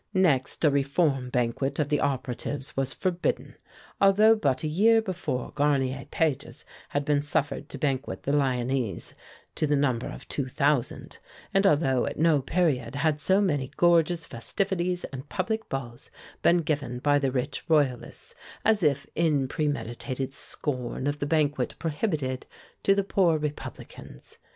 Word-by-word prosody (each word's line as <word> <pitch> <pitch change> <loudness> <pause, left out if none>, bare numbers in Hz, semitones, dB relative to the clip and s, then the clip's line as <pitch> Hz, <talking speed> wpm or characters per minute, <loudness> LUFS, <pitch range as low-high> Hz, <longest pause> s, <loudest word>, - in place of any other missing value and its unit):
Next 155 -6 +2
a 150 - +5
reform 140 -1 +1
banquet 125 +2 -1
of 150 -2 0
the 150 - +2
operatives 135 +1 -3
was 135 0 0
forbidden, 180 0 -2 0.5
although 210 +3 +6
but 140 -11 0
a - - 0
year 215 +9 +4
before 185 - -3
Garnier 135 -2 0
Pages 155 -5 -1 0.2
had 145 0 -1
been 145 -1 +2
suffered 145 -1 -1
to - - -6
banquet 135 -1 -2
the 140 - -1
Lyonnese 130 -4 0 0.4
to 155 - 0
the 145 - +2
number 130 -4 +1
of - - -9
two 140 -3 -2
thousand, 140 -1 0 0.3
and 195 +1 +4
although 135 -6 +2
at - - -4
no 155 -2 +3
period 135 -5 0
had 150 0 +1
so 190 +7 +4
many 145 -10 0
gorgeous 170 -1 +3
festivities 180 - -2
and 135 +1 -7
public 220 +3 -2
balls 120 -3 -6 0.3
been 170 0 +4
given 145 -5 -2
by 145 +3 +3
the 135 -2 0
rich 135 +2 -2
Royalists, 145 -6 0 0.3
as 215 -1 +4
if 140 -4 +2
in 150 -5 +1
premeditated 135 -2 -3
scorn 130 -2 -4
of 145 +1 -1
the 145 - -2
banquet 150 -1 +1
prohibited 150 - -2 0.3
to 195 - +4
the 200 - +1
poor 180 -4 +2
Republicans. 150 -1 -8
145 Hz, 150 wpm, -27 LUFS, 135-170 Hz, 0.5 s, although